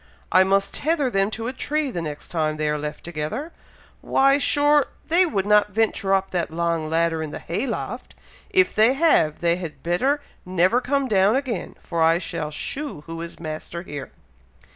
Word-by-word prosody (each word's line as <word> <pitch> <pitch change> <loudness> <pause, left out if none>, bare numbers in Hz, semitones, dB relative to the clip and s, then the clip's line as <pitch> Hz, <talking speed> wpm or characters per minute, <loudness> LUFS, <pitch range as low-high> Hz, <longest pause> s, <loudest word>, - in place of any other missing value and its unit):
I 185 +1 +6
must 195 +1 +1
tether 300 -4 0
them 195 -1 +2
to 225 +1 -5
a 250 - -3
tree 295 +1 -1
the 175 - -3
next 150 -2 -6
time 155 -2 -1
they 155 0 -1
are 150 - 0
left 150 0 -6
together! 175 - -4 0.5
Why! 275 +1 +3
sure! 290 0 +3 0.2
they 355 +3 +5
would 200 - -1
not 210 0 +4
venture 220 -3 +2
up 195 0 -1
that 175 -2 -1
long 165 -1 -1
ladder 165 0 +1
in 155 - -4
the - - -6
hay 205 +11 -3
loft! - - -5 0.3
If 375 -1 +3
they 220 +4 +4
have, 270 - +2
they 170 0 +2
had 170 -4 -8
better 260 - +1 0.2
never 185 +6 +2
come 275 +1 0
down 200 0 +3
again, 260 -7 -3
for 170 - -2
I 165 +1 +5
shall 160 -3 -4
shew 270 - -4
who 165 +2 -7
is 170 0 -8
master 160 +1 -6
here." 145 -6 -7
190 Hz, 185 wpm, -23 LUFS, 165-265 Hz, 0.5 s, I